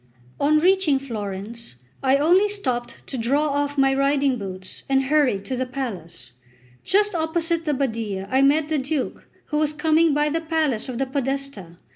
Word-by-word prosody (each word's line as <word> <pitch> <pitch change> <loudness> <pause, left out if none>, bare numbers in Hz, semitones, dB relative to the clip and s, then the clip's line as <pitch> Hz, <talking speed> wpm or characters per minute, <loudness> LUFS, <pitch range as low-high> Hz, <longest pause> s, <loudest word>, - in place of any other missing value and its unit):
On 300 +2 +3
reaching 360 -3 +3
Florence, 220 - -6 0.3
I 270 0 +3
only 355 +8 +4
stopped 255 -13 -4
to 265 - -5
draw 280 +6 +1
off 285 0 -1
my 270 0 +4
riding 275 -1 +1
boots, 185 -2 -7
and 270 0 +3
hurried 265 -8 +2
to 260 - -3
the 255 +1 -2
palace. 185 - -6 0.5
Just 415 +1 +2
opposite 330 0 -1
the 300 - +1
Badia 220 -7 -2
I 265 - +3
met 290 +2 +3
the 310 -1 0
Duke, 275 +1 -3 0.2
who 300 - -1
was 305 0 +1
coming 315 +1 +3
by 295 0 +2
the 325 +2 -1
palace 310 -8 -1
of 245 - -4
the 270 - 0
Podesta. 270 - -4
275 Hz, 170 wpm, -23 LUFS, 240-305 Hz, 0.5 s, only